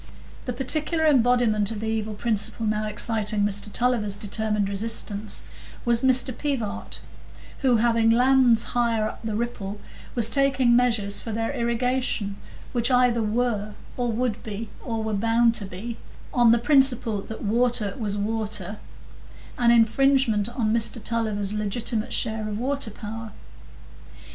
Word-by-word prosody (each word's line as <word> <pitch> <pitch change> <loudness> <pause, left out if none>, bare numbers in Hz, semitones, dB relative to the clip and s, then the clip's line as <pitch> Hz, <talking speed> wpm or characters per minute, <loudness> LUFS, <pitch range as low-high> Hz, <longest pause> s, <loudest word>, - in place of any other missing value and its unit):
The 250 - -3
particular 310 +6 +2
embodiment 245 -7 +3
of 225 -2 -4
the 220 - -4
evil 220 -1 -2
principle 220 0 +1
now 215 0 -1
exciting 215 0 -1
Mr 205 0 +1
Tulliver's 220 -4 0
determined 210 -1 -1
resistance 210 0 -1 0.4
was 235 -1 +2
Mr 260 -1 +2
Pivart, 235 -8 -3 0.6
who, 260 -3 +3
having 230 0 +3
lands 245 -1 +5
higher 230 -3 +1
up - - -7
the 220 -2 -3
Ripple, 210 -3 -4 0.4
was 235 -3 +3
taking 265 -2 +3
measures 225 -5 0
for 225 - -6
their 225 +1 -2
irrigation, 235 -3 -1 0.3
which 235 0 0
either 250 -2 +3
were, 215 -2 -1 0.2
or 245 -2 -1
would 230 -1 -2
be, 220 +1 -6
or 225 -2 -3
were 220 0 -2
bound 230 +3 +3
to 205 -4 -7
be 215 +6 -7 0.4
(on 240 -2 +5
the 235 - +5
principle 245 -5 +2
that 220 - -8
water 230 -1 +1
was 205 -3 -2
water), 210 -2 -3 0.8
an 240 -1 +4
infringement 235 -1 +3
on 235 -3 -1
Mr 230 +1 +2
Tulliver's 215 -3 0
legitimate 215 +2 -2
share 220 -1 -1
of 205 - -3
water 275 +1 -2
power. 220 0 -8
225 Hz, 140 wpm, -24 LUFS, 210-245 Hz, 0.8 s, lands